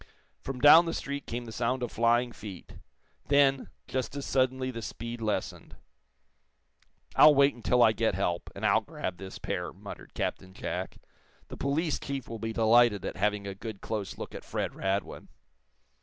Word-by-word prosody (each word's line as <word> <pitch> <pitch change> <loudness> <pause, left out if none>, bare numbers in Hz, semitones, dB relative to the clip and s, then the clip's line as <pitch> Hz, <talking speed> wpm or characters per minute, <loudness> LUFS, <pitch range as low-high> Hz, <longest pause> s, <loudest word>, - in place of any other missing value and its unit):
From 135 -2 -6
down 155 +6 +9
the 165 - -2
street 140 0 -5
came 120 +1 -4
the 115 - -8
sound 125 +3 -1
of 120 - -3
flying 120 +1 +2
feet. 105 -5 -10 0.5
Then, 140 -1 +3 0.2
just 130 +1 -3
as 140 - -4
suddenly 130 0 +1
the 115 -2 -6
speed 115 +1 -6
lessened. 110 -2 -3 1.4
"I'll 150 -1 +8
wait 140 +1 +5
until 120 +1 +2
I 110 - +6
get 110 -2 0
help, 90 -3 -1
and 100 - -4
I'll 110 +1 +4
grab 140 - -5
this 95 -1 -8
pair," - - -3
muttered - - -11
Captain 95 0 -3
Jack. - - -4 0.5
"The - - -8
police 150 +3 0
chief 140 -2 -5
will 115 - -6
be 115 +1 -3
delighted 110 -2 +4
at - - -4
having 105 +1 0
a 100 - -4
good, 105 +1 -7
close 105 -3 -4
look - - -7
at - - -8
Fred - - -3
Radwin!" 95 +1 -3
115 Hz, 170 wpm, -29 LUFS, 105-135 Hz, 1.4 s, down